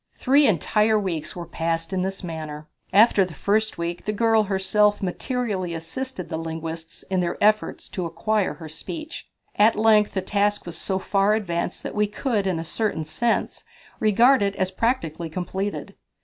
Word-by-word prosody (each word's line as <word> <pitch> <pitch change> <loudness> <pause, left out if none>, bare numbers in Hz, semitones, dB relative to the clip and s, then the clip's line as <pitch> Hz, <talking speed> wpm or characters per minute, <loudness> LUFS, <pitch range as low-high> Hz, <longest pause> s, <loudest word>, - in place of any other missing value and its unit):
Three 280 +2 +4
entire 215 +3 +2
weeks 170 -7 -3
were 175 -1 -6
passed 165 +1 -2
in 185 - 0
this 190 +1 -3
manner. 155 -3 -6 0.2
After 205 0 +6
the 180 -4 -6
first 215 +7 +1
week 170 +1 -4
the 210 - 0
girl 225 0 +3
herself 205 +2 +2
materially 190 -3 -2
assisted 180 +5 -5
the 160 - -4
linguists 165 +1 -6
in 190 - +2
their 175 -1 -1
efforts 215 +1 +2
to 180 -3 -3
acquire 210 +4 0
her 160 - -9
speech. 310 - -7 0.3
At 215 +2 +5
length 215 -1 +4
the 190 - +1
task 205 +1 0
was 175 - -6
so 190 - -2
far 195 +2 +2
advanced 175 -5 -3
that - - -5
we 210 0 +1
could, 210 -2 -1
in 185 -3 0
a 165 - -4
certain 170 -3 -2
sense, 230 +10 -1 0.4
regard 235 +5 +5
it 200 0 0
as 185 -1 -1
practically 175 - -1
completed. 190 +4 -4
195 Hz, 170 wpm, -24 LUFS, 170-215 Hz, 0.4 s, After